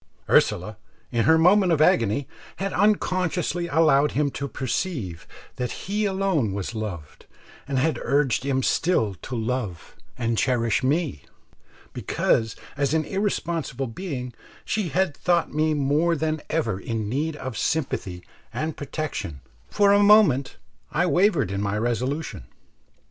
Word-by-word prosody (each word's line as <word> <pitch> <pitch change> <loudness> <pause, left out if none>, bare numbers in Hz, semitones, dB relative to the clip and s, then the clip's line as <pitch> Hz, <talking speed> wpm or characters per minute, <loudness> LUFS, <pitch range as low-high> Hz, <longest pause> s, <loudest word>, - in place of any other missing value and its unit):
Ursula, 100 +4 +2 0.3
in 115 -2 +1
her 160 0 +6
moment 180 +3 +5
of 160 - +2
agony, 120 -3 +3 0.3
had 195 0 -3
unconsciously 180 -4 +1
allowed 150 -2 +3
him 145 -1 +1
to 140 - -4
perceive 130 - -3 0.3
that 125 -1 -2
he 210 +3 0
alone 190 - 0
was 100 +3 -4
loved, 95 -9 -7 0.4
and 140 -2 -1
had 140 0 +1
urged 140 -3 +1
him 135 -1 0
still 115 - +1
to 130 - -6
love 110 -6 -3 0.2
and 115 -2 0
cherish 115 -3 +1
me, 140 - -1 0.7
because 110 -1 0 0.2
as 140 +2 0
an 155 -1 +1
irresponsible 170 - -2
being 125 -2 -5 0.3
she 210 -5 -1
had 170 0 0
thought 175 -1 +1
me 155 +1 +1
more 150 +4 +2
than 155 0 -1
ever 115 -12 -1
in 110 0 -3
need 150 +7 -1
of 130 -5 -6
sympathy 100 - -2 0.3
and 155 0 -3
protection 145 - -5 0.3
For 200 -1 +4
a 205 - +5
moment 200 -11 +5 0.3
I 160 +4 +1
wavered 175 - +2
in 100 0 -2
my 100 0 -1
resolution. 120 - -2
145 Hz, 140 wpm, -24 LUFS, 115-170 Hz, 0.7 s, her